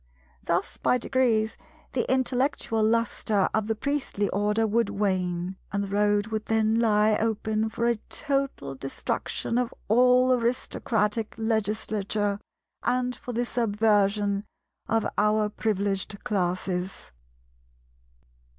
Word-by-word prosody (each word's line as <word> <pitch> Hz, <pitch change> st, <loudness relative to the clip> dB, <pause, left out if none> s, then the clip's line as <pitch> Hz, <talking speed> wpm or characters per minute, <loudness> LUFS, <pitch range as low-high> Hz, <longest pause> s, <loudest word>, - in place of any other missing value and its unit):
Thus -, -, -1 dB
by 250 Hz, -, +2 dB
degrees 230 Hz, -3 st, +1 dB, 0.3 s
the -, -, 0 dB
intellectual 255 Hz, -3 st, +1 dB
lustre 220 Hz, -3 st, +1 dB
of 220 Hz, -1 st, 0 dB
the 220 Hz, -, 0 dB
Priestly 270 Hz, -5 st, -1 dB
Order 210 Hz, +3 st, +1 dB
would 230 Hz, +2 st, +1 dB
wane, 185 Hz, -2 st, -1 dB
and 200 Hz, 0 st, -1 dB
the -, -, -4 dB
road 205 Hz, 0 st, +2 dB
would 220 Hz, -1 st, -3 dB
then 220 Hz, 0 st, +2 dB
lie 215 Hz, -1 st, +4 dB
open 220 Hz, 0 st, 0 dB
for 235 Hz, +1 st, -2 dB
a 235 Hz, -1 st, +2 dB
total 275 Hz, -, -2 dB
destruction 135 Hz, -, -2 dB
of 250 Hz, -2 st, -1 dB, 0.2 s
all 250 Hz, +2 st, +5 dB
Aristocratic 230 Hz, -2 st, -1 dB
Legislature 215 Hz, -2 st, -1 dB, 0.4 s
and 250 Hz, 0 st, 0 dB
for 245 Hz, -, -7 dB
the 240 Hz, +1 st, 0 dB
subversion 205 Hz, -3 st, +1 dB, 0.5 s
of 225 Hz, 0 st, +2 dB
our 210 Hz, 0 st, +3 dB
Privileged 200 Hz, -1 st, -2 dB
Classes. 185 Hz, -, -2 dB
215 Hz, 115 wpm, -26 LUFS, 205-235 Hz, 0.5 s, all